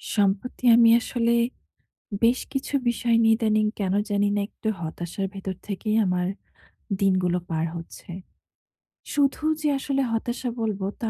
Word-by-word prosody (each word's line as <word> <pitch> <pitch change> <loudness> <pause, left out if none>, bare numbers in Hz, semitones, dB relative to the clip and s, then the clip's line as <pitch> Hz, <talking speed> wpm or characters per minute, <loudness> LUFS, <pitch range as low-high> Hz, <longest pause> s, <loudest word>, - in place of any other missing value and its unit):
সম্প্রতি 205 +5 0
আমি 235 -1 +7
আসলে 235 -2 0 0.9
বেশ 235 +2 +4
কিছু 270 +1 -4
বিষয় 235 0 +1
নিয়ে 225 0 +5
ইদানীং 215 -2 +2
কেন 190 -1 0 0.2
জানি 205 0 +2
না - - +1
একটু 220 - -6
হতাশার 175 +4 -4
ভেতর 195 -1 -5
থেকেই 215 +2 -1
আমার 180 -1 0 0.7
দিনগুলো 185 -2 +2
পার 160 0 0
হচ্ছে। 165 +1 -10 1.0
শুধু 285 +1 +1 0.2
যে 305 - +1
আসলে 275 0 -1
হতাশা 240 +2 -2
বলব 215 -3 -1 0.2
তা 225 - 0
215 Hz, 135 wpm, -25 LUFS, 190-235 Hz, 1.0 s, আমি